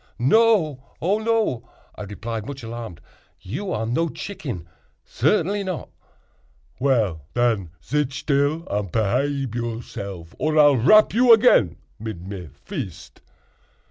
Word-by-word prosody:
"No—oh 165 Hz, -, +2 dB
no!" 220 Hz, -, 0 dB, 0.2 s
I -, -, -10 dB
replied, 105 Hz, +2 st, -5 dB
much 135 Hz, -2 st, -7 dB
alarmed, 115 Hz, -6 st, -7 dB, 0.4 s
"you 185 Hz, -, -5 dB
are 110 Hz, -, -1 dB
no 160 Hz, +9 st, 0 dB
chicken—certainly 165 Hz, -, -3 dB
not." 185 Hz, -3 st, -4 dB, 0.9 s
"Well, 110 Hz, -, +1 dB
den, 115 Hz, -7 st, +1 dB, 0.2 s
zit 145 Hz, 0 st, 0 dB
still 145 Hz, +3 st, 0 dB
and 100 Hz, -3 st, -2 dB
pehabe 130 Hz, -, 0 dB
yourself, 105 Hz, -7 st, -5 dB
or 155 Hz, 0 st, 0 dB
I'll 145 Hz, -2 st, +7 dB
rap 215 Hz, -, +6 dB
you 240 Hz, +2 st, +5 dB
again 215 Hz, -, +6 dB, 0.2 s
mid 105 Hz, -5 st, -6 dB
me 95 Hz, -5 st, -7 dB, 0.2 s
vist. -, -, -7 dB
130 Hz, 110 wpm, -23 LUFS, 110-160 Hz, 0.9 s, I'll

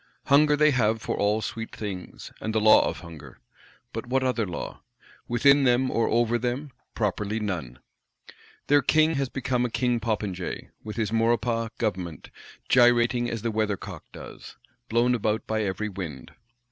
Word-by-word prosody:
Hunger 150 Hz, +1 st, +5 dB
they 150 Hz, 0 st, +5 dB
have 115 Hz, -4 st, +2 dB
for 105 Hz, -, -3 dB
all 105 Hz, +2 st, +1 dB
sweet 115 Hz, +2 st, -5 dB
things; 100 Hz, -4 st, -7 dB
and 110 Hz, 0 st, -3 dB
the -, -, +4 dB
law 110 Hz, 0 st, +6 dB
of -, -, -7 dB
Hunger; 85 Hz, -4 st, -11 dB, 0.6 s
but 115 Hz, +1 st, -5 dB
what 130 Hz, +1 st, +1 dB
other 125 Hz, -5 st, 0 dB
law? 90 Hz, -, -6 dB, 0.5 s
Within 140 Hz, +4 st, +4 dB
them, 130 Hz, 0 st, +3 dB
or 115 Hz, -, +1 dB
over 120 Hz, +1 st, +2 dB
them, 125 Hz, +4 st, -3 dB, 0.2 s
properly 105 Hz, 0 st, -1 dB
none! 85 Hz, -, -4 dB, 0.9 s
Their 145 Hz, 0 st, +4 dB
King 155 Hz, +2 st, +3 dB
has 135 Hz, -3 st, -1 dB
become 125 Hz, -1 st, -1 dB
a 125 Hz, -, 0 dB
King 120 Hz, 0 st, 0 dB
Popinjay; 105 Hz, -5 st, -3 dB
with 105 Hz, -1 st, -7 dB
his 110 Hz, -2 st, -1 dB
Maurepas 115 Hz, 0 st, +1 dB
Government, 90 Hz, -7 st, -3 dB, 0.4 s
gyrating 120 Hz, 0 st, +4 dB
as 115 Hz, -2 st, -4 dB
the 115 Hz, -, 0 dB
weather 110 Hz, -2 st, 0 dB
cock -, -, -9 dB
does, -, -, -11 dB, 0.3 s
blown 120 Hz, +2 st, +3 dB
about 110 Hz, -2 st, -1 dB
by 110 Hz, 0 st, -1 dB
every 100 Hz, +1 st, -2 dB
wind. 85 Hz, -10 st, -7 dB
115 Hz, 160 wpm, -26 LUFS, 105-125 Hz, 0.9 s, law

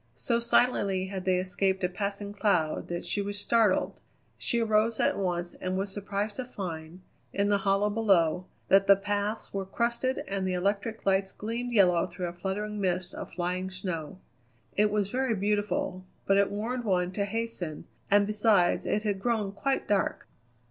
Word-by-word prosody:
So 235 Hz, -, 0 dB
silently 200 Hz, -6 st, +2 dB
had 190 Hz, -1 st, -5 dB
they 185 Hz, -1 st, +3 dB
escaped 190 Hz, +1 st, 0 dB
a -, -, +4 dB
passing 200 Hz, +2 st, -4 dB
cloud 180 Hz, -7 st, +1 dB
that 175 Hz, 0 st, -4 dB
she 205 Hz, -, -1 dB
was 200 Hz, 0 st, -2 dB
startled. 220 Hz, -2 st, +2 dB, 0.4 s
She 235 Hz, -, +1 dB
arose 220 Hz, 0 st, +2 dB
at -, -, +3 dB
once 175 Hz, -2 st, -1 dB
and 185 Hz, 0 st, -3 dB
was 195 Hz, 0 st, -2 dB
surprised 205 Hz, +1 st, -3 dB
to 255 Hz, -, -3 dB
find, 175 Hz, -6 st, -6 dB, 0.3 s
in 200 Hz, +1 st, +1 dB
the 205 Hz, -1 st, +3 dB
hollow 195 Hz, +1 st, +2 dB
below, 185 Hz, -5 st, +2 dB, 0.2 s
that 195 Hz, 0 st, +5 dB
the 200 Hz, -, +9 dB
paths 205 Hz, +2 st, -2 dB
were 195 Hz, -1 st, -1 dB
crusted 235 Hz, +6 st, -1 dB
and 195 Hz, -1 st, -1 dB
the 185 Hz, -, 0 dB
electric 200 Hz, +4 st, -1 dB
lights 195 Hz, 0 st, +2 dB
gleamed 235 Hz, +3 st, -4 dB
yellow 180 Hz, -6 st, +4 dB
through 180 Hz, 0 st, -5 dB
a -, -, -9 dB
fluttering 205 Hz, +3 st, -3 dB
mist 180 Hz, -1 st, -1 dB
of -, -, -7 dB
flying 180 Hz, +2 st, -2 dB
snow. 185 Hz, -4 st, -5 dB, 0.6 s
It 210 Hz, +1 st, +4 dB
was 205 Hz, -1 st, 0 dB
very 255 Hz, -2 st, +1 dB
beautiful, 200 Hz, -2 st, -1 dB, 0.2 s
but 195 Hz, -, +4 dB
it 200 Hz, 0 st, +4 dB
warned 230 Hz, +5 st, -3 dB
one 180 Hz, -4 st, +1 dB
to 200 Hz, +1 st, -1 dB
hasten, 205 Hz, -7 st, -4 dB, 0.2 s
and 205 Hz, 0 st, +5 dB
besides 210 Hz, -3 st, +3 dB
it 210 Hz, -, 0 dB
had 200 Hz, -3 st, -1 dB
grown 220 Hz, -4 st, 0 dB
quite 270 Hz, +7 st, -1 dB
dark. 200 Hz, -2 st, 0 dB
200 Hz, 175 wpm, -29 LUFS, 185-210 Hz, 0.6 s, the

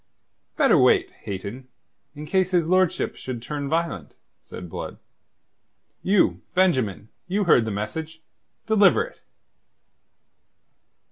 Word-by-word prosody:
"Better -, -, +4 dB
wait, -, -, +4 dB
Hayton, 100 Hz, +7 st, -7 dB, 0.5 s
in 150 Hz, +1 st, -7 dB
case 185 Hz, +3 st, +1 dB
his 175 Hz, -4 st, +1 dB
lordship 185 Hz, 0 st, +1 dB
should 130 Hz, -2 st, -6 dB
turn 140 Hz, +3 st, -5 dB
violent," 160 Hz, -, -2 dB, 0.3 s
said 90 Hz, -, -9 dB
Blood. 80 Hz, -, -7 dB, 1.0 s
"You, 195 Hz, +1 st, +2 dB
Benjamin, 130 Hz, -, +1 dB, 0.2 s
you 200 Hz, +3 st, 0 dB
heard 125 Hz, -, +4 dB
the -, -, -3 dB
message. 155 Hz, +11 st, -5 dB, 0.5 s
Deliver 215 Hz, -3 st, +4 dB
it." -, -, -12 dB
155 Hz, 110 wpm, -24 LUFS, 110-185 Hz, 1.0 s, Better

